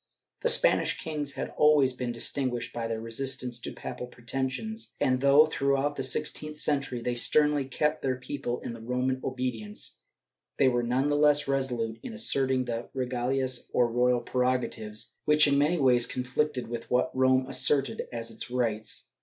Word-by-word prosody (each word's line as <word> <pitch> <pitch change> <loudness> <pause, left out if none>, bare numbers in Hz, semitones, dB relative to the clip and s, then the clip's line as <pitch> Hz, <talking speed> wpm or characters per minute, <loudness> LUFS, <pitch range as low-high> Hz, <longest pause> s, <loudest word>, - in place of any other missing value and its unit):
The 485 - +1
Spanish - - +3
kings 150 -3 -3
had - - -5
always 150 -4 +5
been 125 -1 -3
distinguished 120 +1 -1
by 115 -1 -3
their 115 -1 -3
resistance 125 +1 -1
to - - -6
papal 125 - -7
pretensions 130 - -4
and 130 -3 +1
though, 140 +2 +6
throughout 140 -1 0
the 135 - -3
sixteenth 150 +3 -1
century, 140 -5 0
they 125 - -1
sternly 150 +3 +3
kept 150 +4 -1
their 130 -1 0
people 130 -1 -4
in - - -5
the 115 - -10
Roman 125 +2 -1
obedience, 125 -5 -3 0.6
they 135 - +4
were 120 -1 +2
none 125 +4 0
the 145 - +1
less 145 -1 +3
resolute 125 -5 -1
in 245 - -7
asserting 135 - +1
the 115 -1 -4
regalias, 130 0 -1
or 120 -1 +2
royal 125 0 +2
prerogatives, 120 -3 -2
which 150 0 +5
in 140 0 +3
many 155 +5 +2
ways 125 -5 +4
conflicted 130 +1 -2
with 115 0 -6
what 125 +1 +1
Rome 130 0 +3
asserted 135 0 +2
as 115 -1 -5
its 115 - -8
rights. 110 -4 -2
130 Hz, 165 wpm, -28 LUFS, 120-140 Hz, 0.6 s, though